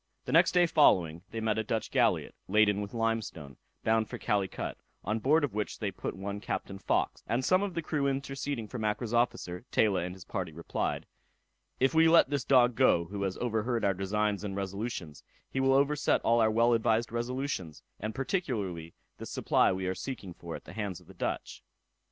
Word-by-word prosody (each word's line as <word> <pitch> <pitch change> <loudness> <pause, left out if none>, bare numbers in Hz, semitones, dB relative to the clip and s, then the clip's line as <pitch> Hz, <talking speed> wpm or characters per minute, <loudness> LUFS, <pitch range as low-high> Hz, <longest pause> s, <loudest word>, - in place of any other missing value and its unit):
The - - -4
day 180 -1 +5
following 85 - +4
they 115 - -5
met 110 -1 +1
a - - 0
Dutch 110 0 -2
galliot, - - +2
laden 105 0 +3
with 100 +2 -6
limestone, 110 - -2 0.3
bound 110 -1 +2
for - - -5
Calicut, 100 -4 -2 0.2
on 105 +4 -1
board 150 +7 +3
of 145 - -1
which 105 0 -3
they 105 -3 -2
put - - -5
one 100 +1 -5
Captain 95 -2 -4
Fawkes; - - 0
and 125 +2 0
some 185 +1 +4
of 200 -4 -3
the 170 - -2
crew 145 -3 0
interceding 135 -3 -3
for 125 - -6
Mackra's 110 +2 -2
officer, 120 -7 0
Taylor 100 -5 +2
and 90 +1 -5
his 95 -4 -12
party 90 -2 -4
replied, 85 +2 -3 0.7
"If 135 +3 +3
we 160 0 +6
let 165 -4 +6
this 140 -3 0
dog 125 -2 +5
go, 110 -9 +4
who 100 +3 -6
has 95 -1 -2
overheard 115 -1 -1
our 100 - +3
designs 100 +2 -1
and 100 -2 -4
resolutions, 100 -5 -4 0.3
he 135 - -1
will 135 0 +4
overset 140 +2 +3
all 115 0 +3
our 110 - +4
well 115 +2 +3
advised 115 0 +1
resolutions, 120 - -3 0.2
and 110 +1 -4
particularly 110 - -2 0.2
this - - -7
supply - - +2
we 95 0 -2
are 95 - 0
seeking 100 -5 -6
for 85 -1 -8
at - - -10
the - - -10
hands 100 -5 -4
of - - -20
the - - -14
Dutch." - - -4
110 Hz, 195 wpm, -30 LUFS, 95-125 Hz, 0.7 s, we